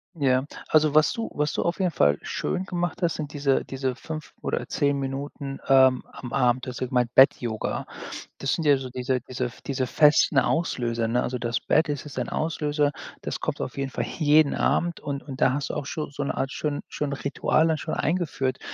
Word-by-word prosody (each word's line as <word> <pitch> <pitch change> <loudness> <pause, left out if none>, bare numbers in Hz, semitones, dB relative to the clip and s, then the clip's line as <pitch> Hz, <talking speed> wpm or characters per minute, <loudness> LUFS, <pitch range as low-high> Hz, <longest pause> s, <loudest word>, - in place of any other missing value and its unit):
Ja, 130 -3 +2 0.2
also 155 -1 +4
was 155 0 +5
du 230 -1 -4
was 150 0 0
du - - 0
auf 170 +2 -1
jeden 185 -2 +2
Fall 75 - +3
schön 185 - -2
gemacht 175 -1 -3
hast, 170 -2 +1
sind 150 -2 -5
diese 140 -2 +1
diese 130 -1 -2
5 155 +2 -7
oder - - -2
10 140 -2 +1
Minuten, 135 +1 -4
ähm, 130 -1 +5
am 125 -1 -9
Abend 125 -1 +2
du - - -2
hast 125 - -7
ja 130 - 0
gemeint: 125 -2 +1
Bett-Yoga. 120 -4 +3 0.5
Das 140 - 0
sind 165 - -1
ja 145 -1 +6
so 130 -1 -6
diese 125 0 -1
diese 125 0 -3 0.2
diese 130 -2 -1
festen 150 +1 +4
Auslöser, 120 -8 +1
ne? 120 +2 +1
Also, 125 0 -3
das 120 0 -1
Bett 160 - +2
es 145 -1 -3
ist 145 -3 -6
ein 120 - -2
Auslöser, 150 -2 0 0.3
das - - -3
kommt - - -3
auf - - -4
jeden 135 -1 -2
Fall - - -3
jeden 150 -2 +3
Abend 170 -1 +1
und 140 -1 -4
und 135 -3 -8
da 130 - +5
hast 145 +1 -2
du - - -8
auch 140 - -3
schon 155 0 -3
so 145 0 -3
'ne - - -3
Art 135 +1 -1
schön 145 -1 -2
schön 150 -1 -3
Ritual 140 +3 +1
dann 160 -2 +1
schon - - -3
eingeführt. 140 -6 -1
140 Hz, 215 wpm, -25 LUFS, 130-150 Hz, 0.5 s, ja